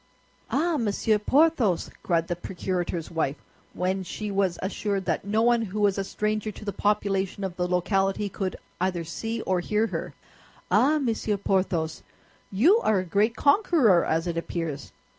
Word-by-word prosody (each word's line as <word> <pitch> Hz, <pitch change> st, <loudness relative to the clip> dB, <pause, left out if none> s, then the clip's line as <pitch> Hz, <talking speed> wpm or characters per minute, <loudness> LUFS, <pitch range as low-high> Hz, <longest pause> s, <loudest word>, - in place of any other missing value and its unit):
"Ah, 325 Hz, +3 st, +1 dB
Monsieur 215 Hz, -1 st, +1 dB
Porthos," 260 Hz, -, +2 dB
cried 165 Hz, -2 st, 0 dB
the 175 Hz, -, -1 dB
procurator's 175 Hz, -2 st, -3 dB
wife, 160 Hz, -4 st, 0 dB, 0.4 s
when 185 Hz, +1 st, -1 dB
she 205 Hz, +3 st, -5 dB
was 195 Hz, -3 st, +1 dB
assured 195 Hz, 0 st, -2 dB
that -, -, -1 dB
no 215 Hz, +2 st, +1 dB
one 240 Hz, 0 st, +4 dB
who 210 Hz, -1 st, -4 dB
was 205 Hz, -1 st, +2 dB
a -, -, 0 dB
stranger 215 Hz, +2 st, -2 dB
to 210 Hz, -, -11 dB
the 200 Hz, -, -3 dB
population 200 Hz, -2 st, 0 dB
of 190 Hz, -2 st, -3 dB
the 180 Hz, 0 st, -1 dB
locality 195 Hz, +3 st, +1 dB
could 190 Hz, -1 st, -3 dB, 0.2 s
either 180 Hz, -2 st, -1 dB
see 225 Hz, +7 st, -4 dB
or 185 Hz, -1 st, 0 dB
hear 210 Hz, +5 st, +1 dB
her, -, -, -4 dB, 0.6 s
"ah, 295 Hz, +4 st, +4 dB
Monsieur 225 Hz, -6 st, -1 dB
Porthos, 185 Hz, -5 st, 0 dB, 0.5 s
you 305 Hz, -, +5 dB
are 215 Hz, -, +2 dB
a 185 Hz, -, -1 dB
great 205 Hz, +6 st, +1 dB
conqueror, 285 Hz, -, +4 dB
as 165 Hz, +1 st, 0 dB
it 170 Hz, -1 st, -2 dB
appears!" 165 Hz, -4 st, -4 dB
195 Hz, 160 wpm, -26 LUFS, 180-220 Hz, 0.6 s, you